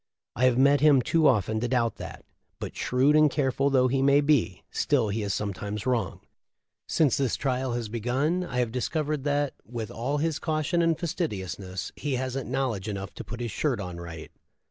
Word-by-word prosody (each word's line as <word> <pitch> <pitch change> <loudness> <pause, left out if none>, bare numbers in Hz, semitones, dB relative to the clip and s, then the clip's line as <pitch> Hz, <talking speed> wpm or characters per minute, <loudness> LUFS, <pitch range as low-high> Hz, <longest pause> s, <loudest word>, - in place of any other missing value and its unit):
I 125 - +2
have 125 -1 +4
met 140 +1 +5
him 145 -4 +6
too 160 +3 +3
often 110 -1 +2
to 120 - -1
doubt 120 -2 0
that; - - -9 0.3
but - - -6
shrewd 135 +4 +2
and 155 0 +6
careful 135 -1 +1
though 130 -2 +4
he 135 +1 +1 0.2
be, 140 - +1
still 125 -7 +1
he 110 +2 -1
is 100 -1 -2
sometimes 100 +2 -3
wrong. 120 -7 -1 0.7
Since 150 -6 +2
this 135 -4 +1
trial 130 -2 -1
has 120 -2 -2
begun 130 +11 0
I 135 -8 -5
have 120 -2 -1
discovered 150 +3 -2
that, 145 -1 +1
with 115 -2 -6
all 130 +6 -2
his 155 +1 -1
caution 155 +2 0
and 165 -2 +2
fastidiousness, 95 - -4
he 145 -3 -2
hasn't 130 +1 -3
knowl 130 -1 0
edge 100 0 -6
enough 100 -3 -5
to - - -7
put 120 +1 -7
his 120 -2 -3
shirt 135 +1 0
on 90 -3 -5
right." 85 -2 -8
130 Hz, 190 wpm, -27 LUFS, 110-145 Hz, 0.7 s, him